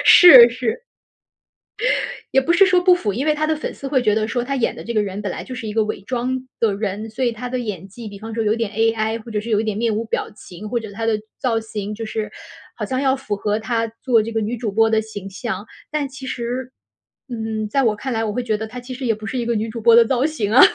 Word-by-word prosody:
是 260 -10 +10
是。 240 - -3 1.5
也 270 - +5
不 315 - +1
是 390 +3 +7
说 370 -1 +4
不 365 0 +6
符。 210 - -2
因 255 +8 -2
为 305 - +3
她 305 +1 0
的 315 - +1
粉 300 - -4
丝 275 - -7
会 265 -2 +2
觉 210 -3 +2
得 215 0 0
说 240 +1 -1
她 275 +2 -2
演 250 - 0
的 - - -8
这 235 - -4
个 210 - +3
人 200 0 -4
本 200 -3 -3
来 - - -6
就 260 - -8
是 230 -3 -6
一 210 - -4
个 220 0 +3
伪 210 - -4
装 255 +4 -3
的 225 -3 +2
人， 210 +1 -3
所 250 +4 -3
以 240 - +2
她 240 +2 -6
的 250 0 -2
演 195 -6 -5
技 225 +3 -10
比 200 -1 -9
方 220 +2 -8
说 225 0 -1
有 215 +1 +2
点 230 -3 -2
AI 225 0 0
或 235 - -11
者 210 - 0
是 225 +3 -6
有 210 -1 +3
一 - - -3
点 215 -2 -2
面 225 -1 +1
无 220 - -1
表 - - -2
情， 195 0 -10
或 240 - 0
者 220 -2 -8
她 225 +3 -4
的 220 -2 +1 0.2
造 235 -4 0
型 210 -2 -5
就 225 - -6
是 220 -1 -4 0.4
好 - - -5
像 260 0 -1
要 270 -1 +2
符 240 -6 -3
合 210 +1 -1
她 230 0 -1
做 235 -4 +3
这 230 - -5
个 225 - -1
女 225 +3 -2
主 220 -2 -3
播 225 +2 +3
的 220 0 +2
形 205 -3 -8
象。 200 0 -5 0.3
但 300 -2 -1
其 265 0 -9
实， 250 0 -4 0.6
嗯， 220 -2 -3
在 275 +5 +2
我 220 -3 +2
看 260 +5 -5
来， 225 0 0
我 215 -2 -2
会 250 +3 -2
觉 220 -3 0
得 220 +1 -5
她 245 +3 -8
其 250 +1 -8
实 260 +1 -5
也 225 - +2
不 215 0 -9
是 255 - -3
一 235 - -2
个 235 -1 0
女 220 +1 -1
主 230 0 -6
播 230 0 +6
的 235 0 +7
造 260 +2 +1
型 230 -10 -1
啊 255 - +8
225 Hz, 310 characters per minute, -21 LUFS, 215-250 Hz, 1.5 s, 是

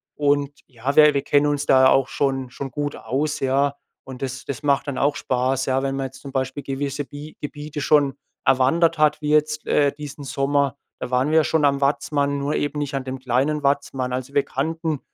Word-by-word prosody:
Und 145 -1 +1 0.2
ja, 130 +2 -4
wir 150 -1 +7
wir 140 - +1
kennen 145 0 +3
uns 145 -1 0
da 130 -1 +6
ja - - +7
auch 135 -1 +3
schon 135 -2 -1
schon 135 +1 -7
gut 145 +3 -3
aus, 145 +3 -2
ja. 140 +1 +1 0.3
Und 130 -1 -9
das 130 0 -5
das 140 +2 -5
macht 140 0 +1
dann 140 - -3
auch 145 +1 +2
Spaß, 130 0 0
ja, 135 0 +1
wenn 135 0 -1
man 135 -1 -2
jetzt 130 - -15
zum 140 - -9
Beispiel 135 +2 -3
gewisse 140 +1 -3
Bi 145 +4 -10
Gebiete 150 0 -6
schon 145 -2 +3 0.3
erwandert 160 +6 +3
hat, 150 0 +2
wie 150 - -2
jetzt, 150 0 +1
äh, 145 -1 +3
diesen 145 -1 -8
Sommer. 140 0 0 0.3
Da 125 - -4
waren 125 +3 +2
wir 160 - +4
ja - - +3
schon 160 -2 +1
am 140 -1 +2
Watzmann, 140 0 +1
nur 145 +2 -1
eben 145 0 -2
nicht 145 -1 -3
an 135 - -2
dem 130 0 -5
kleinen 135 +4 0
Watzmann. 135 -2 0
Also 130 +2 -4
wir 140 -1 +3
kannten 160 +1 -2
140 Hz, 220 wpm, -22 LUFS, 135-145 Hz, 0.3 s, wir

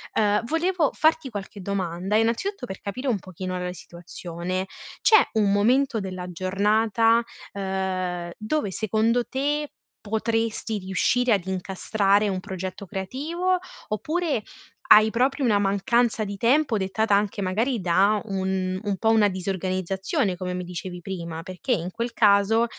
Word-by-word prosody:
Uhm, 210 0 +3
volevo 330 -1 +1
farti 315 -3 +2
qualche 205 -1 -7
domanda, 190 0 -2
innanzitutto, 245 - 0
per 190 -4 -7
capire 255 +7 -3
un 210 -5 +1
pochino 185 0 -5
la 180 0 -3
situazione. 175 +1 -5 0.4
C'è 440 - +7 0.2
un 210 -2 +2
momento 235 +4 +3
della 185 -2 -5
giornata, 215 +5 +2 0.3
uhm, 185 -3 -2
dove, 215 -1 -1
secondo 220 +4 +1
te, 290 +2 -1 0.3
potresti 225 0 -1
riuscire 230 +6 +1
ad 195 -4 +2
incastrare 195 +2 +1
un 190 -2 -1
progetto 190 +1 -6
creativo, 315 - -1 0.3
oppure 310 +3 -1 0.5
hai 215 +1 +7
proprio 265 +4 +1
una 210 -3 +4
mancanza 215 +3 +1
di 200 0 -5
tempo 240 +2 +2
dettata 200 +2 +1
anche, 205 0 0
magari, 220 +6 0
da 195 +4 +3
un 190 -2 -1
un 200 -2 -1
po' 225 - +1
una 210 -2 +4
disorganizzazione, 185 0 -1
come 180 0 -4
mi 180 0 -4
dicevi 180 0 -6
prima? 170 -3 -6
Perché 185 +7 -5
in 180 -4 0
quel 235 +3 -3
caso 210 +2 +4
205 Hz, 135 wpm, -25 LUFS, 185-230 Hz, 0.5 s, C'è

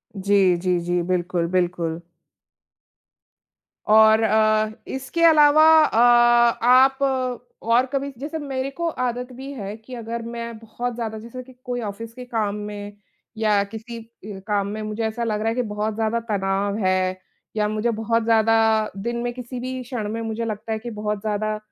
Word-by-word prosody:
जी, 195 -2 +3
जी, 180 0 0
जी। 175 +1 -1
बिल्कुल, 175 -1 -1
बिल्कुल। 175 -2 -1 1.9
और 220 +1 +6
अ, 215 0 +3 0.2
इसके 270 +6 -3
अलावा 305 -1 +6 0.2
अ, 225 - 0 0.7
आप 265 +2 +5 0.6
और 235 +3 +3
कभी 275 +1 -1
जैसे 300 +5 -5
मेरे 270 -2 -3
को 340 0 -1
आदत 250 +1 -2
भी 265 +3 -8
है 205 -4 -6
कि 225 +3 -13
अगर 230 0 -5
मैं 235 -1 -6
बहुत 235 +2 -5
ज़्यादा 220 -2 -4
जैसे 235 +3 -9
कि 260 0 -16
कोई 245 -1 -3
ऑफ़िस 225 +2 -6
के 250 +1 -9
काम 220 -4 -1
में 205 0 -7 0.4
या 210 -2 +2
किसी 220 +3 -8
अ, 220 -3 -11
काम 205 -2 0
में 215 +1 -5
मुझे 215 +1 -4
ऐसा 235 +2 -4
लग 215 -2 -1
रहा 220 +1 0
है 225 - -2
कि 250 - +1
बहुत 210 -1 -3
ज़्यादा 225 +1 0
तनाव 200 +1 0
है 185 0 +1 0.4
या 210 -1 +1
मुझे 215 +2 0
बहुत 230 +1 0
ज़्यादा 225 0 +3 0.4
दिन 235 +4 -3
में 240 - -1
किसी 250 0 -7
भी 255 +1 -4
क्षण 235 -4 -4
में 230 +1 -3
मुझे 225 +1 -3
लगता 220 0 -5
है 220 - -1
कि 240 - -7
बहुत 210 -1 -3
ज़्यादा 215 0 -2
220 Hz, 170 wpm, -22 LUFS, 205-240 Hz, 1.9 s, और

